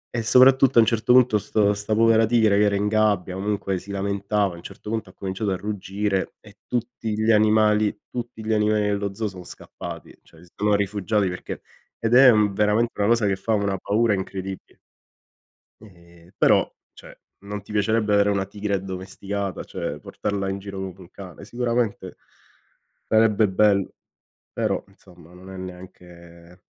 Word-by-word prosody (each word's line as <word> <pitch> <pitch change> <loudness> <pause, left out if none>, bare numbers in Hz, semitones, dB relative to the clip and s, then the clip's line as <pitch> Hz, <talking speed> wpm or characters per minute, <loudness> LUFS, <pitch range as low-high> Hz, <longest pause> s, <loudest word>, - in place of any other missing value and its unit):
E 120 - 0
soprattutto 130 +2 +5
a - - +9
un - - +4
certo 115 +1 +1
punto 125 -4 +5
sto 105 0 +1
sta 105 +1 -2
povera 115 0 +4
tigre 110 -3 +3
che 105 - +4
era 100 -1 +1
in 100 +1 0
gabbia, 105 -4 +1
comunque 100 -1 -2
si 95 - -15
lamentava, 100 0 -1
a - - -10
un - - -11
certo 105 - -9
punto 115 -1 -3
ha - - -17
cominciato 95 +2 -3
a 95 - 0
ruggire 100 0 -3
e 105 -1 -18
tutti 120 -2 -3
gli 110 +1 +3
animali 105 -1 +3
tutti 120 -2 -6
gli 110 - 0
animali 105 0 +2
dello 100 -1 -1
zoo 110 +1 -2
sono 90 -2 -9
scappati, 85 -2 -10
cioè 80 0 -20
si 85 - -24
sono 105 0 +1
rifugiati 100 0 0
perché 90 - -7 0.4
ed 115 +1 -1
è 130 0 +8
veramente 105 +1 +2
una 100 - +2
cosa 115 -1 +3
che 100 -1 +1
fa 100 +4 -2
una 100 -1 0
paura 110 +3 +1
incredibile. 95 0 -6 1.0
Ehm, 85 -4 -18
però - - +3 0.2
cioè, - - -15 0.2
non 105 +1 -7
ti 100 - -13
piacerebbe 105 0 +1
avere 100 0 +4
una 100 -1 0
tigre 100 +1 -3
addomesticata, 95 0 -5
cioè - - -5
portarla 100 -1 -4
in 95 +1 -3
giro 100 0 -8
come 95 -1 -5
un 90 -2 -14
cane? 95 -1 -11
Sicuramente 120 -1 -2 0.9
sarebbe 110 -1 +3
bello, 100 0 +2 0.6
però - - -1
insomma 90 -3 -19
non 90 +1 -13
è 95 - -9
neanche 90 -1 -12
100 Hz, 170 wpm, -23 LUFS, 95-110 Hz, 1.0 s, a